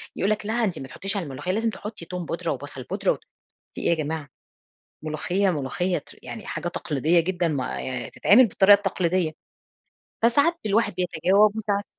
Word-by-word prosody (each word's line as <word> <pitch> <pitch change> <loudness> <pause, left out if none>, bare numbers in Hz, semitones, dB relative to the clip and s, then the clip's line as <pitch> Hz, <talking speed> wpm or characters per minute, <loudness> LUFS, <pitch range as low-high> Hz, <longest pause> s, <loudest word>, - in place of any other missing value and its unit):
يقول 195 - 0
لك 215 -1 -1
لأ، 220 - -1
أنتِ 190 -7 0
ما 135 - -7
تحطيش 195 +7 -4
على 195 - -1
الملوخية، 145 +4 -4
لازم 225 +4 +1
تحطّي 210 -5 -7
توم 180 0 -5
بودرة - - -2
وبصل - - -6
بودرة - - 0
و - - -2 0.6
في - - -6
إيه - - +1
يا 170 - +4
جماعة؟ 155 -1 -4 0.7
ملوخية 175 +6 0
ملوخية 175 +4 -1
ت - - -10
يعني 220 - -8
حاجة - - -3
تقليديّة 160 0 +1
جدًا 175 +1 0
م 145 -5 -1
ي 125 -1 -4
تتعمل 235 +4 +5
بالطريقة 200 +1 +6
التقليديّة، 185 -4 0 0.9
فساعات 285 +9 +4
الواحد 215 +1 +2
بيتجاوب 185 +4 +3
وساعات 205 -2 -1
185 Hz, 175 wpm, -25 LUFS, 160-205 Hz, 0.9 s, بالطريقة